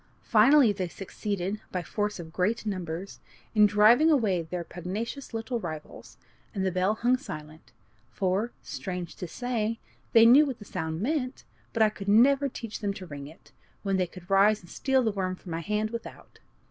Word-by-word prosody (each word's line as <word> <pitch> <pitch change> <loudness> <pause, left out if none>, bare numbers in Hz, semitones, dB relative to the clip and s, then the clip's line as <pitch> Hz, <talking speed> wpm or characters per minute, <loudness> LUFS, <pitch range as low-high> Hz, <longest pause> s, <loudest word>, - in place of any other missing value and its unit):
Finally, 275 -5 +6
they 190 -3 -3
succeeded, 195 +2 -4
by 180 -1 -2
force 210 +2 -2
of 160 -2 -9
great 210 +6 0
numbers, 185 -2 -4 0.3
in 210 -2 +6
driving 215 +9 +5
away 215 - +2
their 170 +2 -5
pugnacious 200 - -5
little 230 +1 -3
rivals, 155 -6 -8 0.4
and 190 -1 -1
the 190 - +1
bell 185 +4 +1
hung 245 +3 +2
silent; 155 - -9 0.4
for, 190 - -1
strange 180 -3 -5
to 180 - -6
say, 230 +1 -2 0.3
they 230 0 +8
knew 255 +6 +8
what 260 -4 -4
the 205 - -12
sound 160 -1 -4
meant, 265 +1 -2 0.3
but 225 - +3
I 215 - +5
could 205 -2 -9
never 275 +6 +5
teach 230 -3 -7
them 200 -3 -2
to 190 - -8
ring 145 -4 -8
it, 160 - -16 0.3
when 195 -2 +1
they 185 -1 +1
could 175 0 -13
rise 200 +2 +4
and 175 - -16
steal 265 -1 +1
the 220 - +1
worm 185 -2 -2
from 180 - -11
my 165 - -2
hand 210 +3 -1
without. 235 0 -9
205 Hz, 185 wpm, -28 LUFS, 180-230 Hz, 0.4 s, they